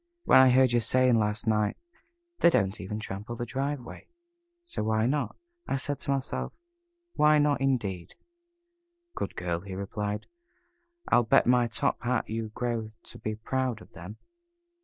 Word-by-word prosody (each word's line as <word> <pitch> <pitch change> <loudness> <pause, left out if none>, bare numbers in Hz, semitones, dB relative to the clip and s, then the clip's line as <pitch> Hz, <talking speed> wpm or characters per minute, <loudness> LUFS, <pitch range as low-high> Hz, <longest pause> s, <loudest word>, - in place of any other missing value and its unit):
When - - +6
I 130 0 +7
heard 130 0 +5
you 120 - +3
saying 125 +1 +4
last 105 +2 -1
night, 105 -2 +1 0.6
'They - - +6
don't 100 - 0
even 105 +3 -5
trample 105 +2 -6
the 120 - -4
driveway, 135 +2 -4 0.6
so 345 - -4
why 110 0 +1
not?' 140 +4 -1 0.3
I - - 0
said 140 +1 -2
to - - -7
myself, 135 -1 -3 0.6
'Why 150 0 +5
not?' 145 -2 +2
indeed." 105 -10 -1 1.0
"Good - - -4
girl," 85 -1 -2
he 95 +1 -8
replied. 105 +1 -4 0.8
"I'll - - +5
bet 115 - +4
my 125 0 +4
top 115 - -1
hat 125 0 0
you 110 0 -3
grow 115 -1 -3
to - - -12
be 110 0 -3
proud 125 +1 -2
of - - -16
them." 90 +6 -9
115 Hz, 160 wpm, -28 LUFS, 105-130 Hz, 1.0 s, I